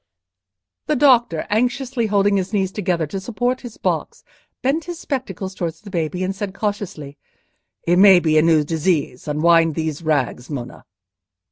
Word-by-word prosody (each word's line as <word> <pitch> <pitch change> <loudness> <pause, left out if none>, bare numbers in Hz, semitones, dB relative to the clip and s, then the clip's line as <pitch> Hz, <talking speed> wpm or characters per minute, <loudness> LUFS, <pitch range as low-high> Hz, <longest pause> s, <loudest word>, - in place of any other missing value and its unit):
The 305 - +1
doctor, 240 - +3
anxiously 245 +1 0
holding 200 -1 +2
his 190 +2 -3
knees 190 -2 0
together 180 -5 -1
to 175 +6 -5
support 245 +5 -2
his 240 -3 -10
box, - - -3 0.4
bent 285 +5 0
his 350 -1 -6
spectacles 205 - -4
towards 165 -3 -4
the 205 -2 -11
baby, 175 +1 -2
and 190 +1 -2
said 195 -1 -5
cautiously, 195 -9 -4 0.7
"It 175 +1 +3
may 190 -2 +8
be 155 -2 +1
a - - +5
new 160 -2 +4
disease; 155 -4 -1
unwind 165 +1 +3
these 160 -1 -3
rags, 145 -5 -1
Monna!" 130 -5 -7
190 Hz, 155 wpm, -20 LUFS, 160-215 Hz, 0.7 s, may